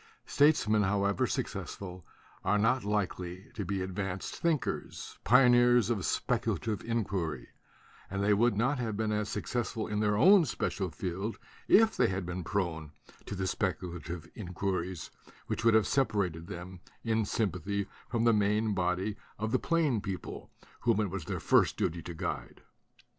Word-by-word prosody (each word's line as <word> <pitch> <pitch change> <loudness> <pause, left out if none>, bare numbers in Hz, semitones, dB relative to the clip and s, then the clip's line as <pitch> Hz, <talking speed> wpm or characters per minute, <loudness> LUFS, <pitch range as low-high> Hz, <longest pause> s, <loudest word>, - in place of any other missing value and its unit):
Statesmen, 135 -8 +4
however 100 0 +1
successful, 90 -2 -4 0.4
are 105 - +2
not 115 +4 +2
likely 95 -3 -3
to 105 - -4
be 95 0 -2
advanced 95 0 -4
think 165 -4 +1
ers, - - -5
pioneers 120 -2 +5
of 100 -6 -1
speculative 110 -3 -1
inquiry; 95 - -2 0.6
and 100 +1 -2
they 105 +1 +4
would 115 +1 +3
not 130 +5 +1
have 110 -4 -2
been 110 -1 0
as 105 0 -1
successful 110 +3 -2
in 105 -1 -2
their 105 -1 +2
own 190 - +7
special 100 - -2
field 95 +7 -4 0.3
if 220 +1 +6
they - - +3
had 95 -1 -2
been 90 +1 -4
prone 80 -6 -2 0.3
to - - -4
the 95 - -3
specu 95 0 -1
lative 85 -1 -7
inquiries 95 -2 -3 0.3
which - - -3
would 115 -1 +5
have 110 - +5
separated 100 - 0
them 90 -1 -8 0.2
in 110 -1 +1
sympathy 100 -1 -1 0.2
from 115 -2 0
the 115 -1 +5
main 105 +1 +2
body 90 +2 0 0.2
of 110 +1 -2
the - - +2
plain 155 -10 +1
people 100 -2 -6 0.3
whom 115 -3 +2
it 105 -4 0
was 95 -5 -4
their - - -3
first - - +3
duty 85 +1 -1
to 85 0 -7
guide. 85 -4 -5
100 Hz, 160 wpm, -31 LUFS, 90-115 Hz, 0.6 s, own